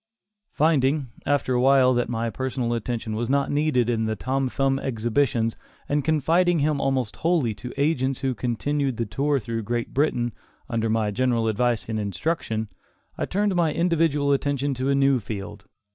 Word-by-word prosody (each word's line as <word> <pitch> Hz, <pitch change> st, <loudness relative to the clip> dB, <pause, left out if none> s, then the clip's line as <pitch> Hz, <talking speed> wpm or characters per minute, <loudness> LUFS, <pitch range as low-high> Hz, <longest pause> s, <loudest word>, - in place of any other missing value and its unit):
Finding, 145 Hz, -3 st, +2 dB, 0.2 s
after 145 Hz, -2 st, +1 dB
a 125 Hz, -, +2 dB
while, 130 Hz, -1 st, +5 dB
that 120 Hz, -1 st, 0 dB
my 115 Hz, -1 st, -2 dB
personal 130 Hz, -2 st, -2 dB
attention 115 Hz, -1 st, -3 dB
was 115 Hz, +2 st, -2 dB
not 140 Hz, 0 st, +1 dB
needed 145 Hz, -5 st, +2 dB
in 115 Hz, -2 st, 0 dB
the 110 Hz, 0 st, -1 dB
Tom 130 Hz, +4 st, -1 dB
Thumb 135 Hz, +1 st, +1 dB
exhibitions 115 Hz, -1 st, 0 dB, 0.3 s
and 145 Hz, 0 st, 0 dB
confiding 165 Hz, +4 st, +2 dB
him 145 Hz, -1 st, +1 dB
almost 130 Hz, -6 st, -1 dB
wholly 160 Hz, -9 st, +1 dB
to 125 Hz, +4 st, -8 dB
agents 135 Hz, -3 st, 0 dB
who 135 Hz, -1 st, 0 dB
continued 130 Hz, +3 st, -1 dB
the 115 Hz, -, -1 dB
tour 140 Hz, +8 st, 0 dB
through 115 Hz, 0 st, -4 dB
Great 120 Hz, +2 st, -3 dB
Britain, 120 Hz, -5 st, +1 dB, 0.3 s
under 115 Hz, -3 st, -1 dB
my 110 Hz, -1 st, +1 dB
general 120 Hz, 0 st, +1 dB
advice 115 Hz, +1 st, 0 dB
and 110 Hz, -1 st, -2 dB
instruction, 110 Hz, -, -2 dB, 0.5 s
I -, -, -2 dB
turned 205 Hz, +1 st, 0 dB
my 170 Hz, -3 st, +2 dB
individual 165 Hz, -4 st, +2 dB
attention 140 Hz, 0 st, 0 dB
to 130 Hz, +1 st, -2 dB
a 140 Hz, -, +3 dB
new 135 Hz, -1 st, +3 dB
field. 105 Hz, -1 st, -7 dB
130 Hz, 170 wpm, -24 LUFS, 115-145 Hz, 0.5 s, while